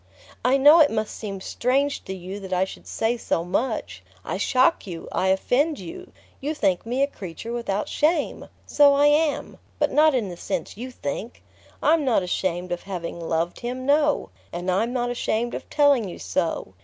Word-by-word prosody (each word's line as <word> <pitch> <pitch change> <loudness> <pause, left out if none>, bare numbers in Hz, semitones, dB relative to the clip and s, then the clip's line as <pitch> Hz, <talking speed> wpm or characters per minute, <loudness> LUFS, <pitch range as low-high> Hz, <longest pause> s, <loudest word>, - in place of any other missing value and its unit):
"I 255 +3 +4
know 295 +5 +8
it 300 -3 +7
must 215 -1 -2
seem 195 -3 -6
strange 275 +7 0
to 190 - -5
you 190 +2 -7
that 190 -1 -9
I 185 +1 +2
should - - -11
say 225 +2 0
so 165 - -1
much. 195 - -2 0.2
I - - -2
shock 255 - +2
you, 170 -3 -7
I 190 - 0
offend 260 +11 +2
you: 365 +2 -9 0.3
you 300 +3 -3
think 195 -4 0
me 255 +4 +1
a - - +5
creature 210 - -7
without 210 -4 -2
shame. 320 +3 0 0.2
So 285 -1 +5
I 285 +1 +4
am 295 +1 +1 0.2
but - - +1
not 305 -1 +5
in 225 -6 0
the 175 - -8
sense - - -4
you 245 +5 -6
think! 230 - -6 0.4
I'm 315 0 +4
not 240 -8 +2
ashamed 180 0 -2
of 175 - -2
having 175 -3 -5
loved 165 +1 -2
him; 255 +1 -4
no; 295 +1 +2 0.2
and 175 +2 -2
I'm 220 +6 +1
not 245 -1 -1
ashamed 240 0 -1
of - - -6
telling 280 -8 +3
you - - -8
so. 165 - -2
235 Hz, 190 wpm, -24 LUFS, 185-280 Hz, 0.4 s, know